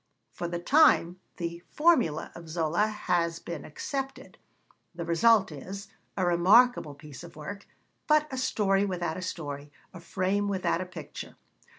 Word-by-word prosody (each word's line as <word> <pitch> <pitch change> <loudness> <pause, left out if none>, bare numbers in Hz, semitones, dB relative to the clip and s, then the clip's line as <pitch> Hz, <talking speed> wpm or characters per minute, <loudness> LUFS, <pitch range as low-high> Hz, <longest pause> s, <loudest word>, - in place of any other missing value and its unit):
For 175 - -4
the 175 0 -3
time 185 - +4 0.2
the 170 0 -4
'formula' 265 - +2
of 170 -1 -11
Zola 170 +5 +1
has 175 -6 0
been 170 - -7
accepted: 270 - -6 0.6
the 170 -1 -4
result 195 +3 +4
is, 195 +8 -8 0.3
a 185 - +1
remarkable 180 - +4
piece 145 -2 -11
of - - -12
work, 200 +7 -8 0.4
but 305 0 +4
a - - -3
story 200 -6 +2
without 180 -4 -2
a - - -5
story, 145 -5 -5 0.2
a 185 - -9
frame 190 +4 -1
without 190 -3 0
a 185 - -5
picture. 180 - -9
180 Hz, 150 wpm, -28 LUFS, 170-205 Hz, 0.6 s, time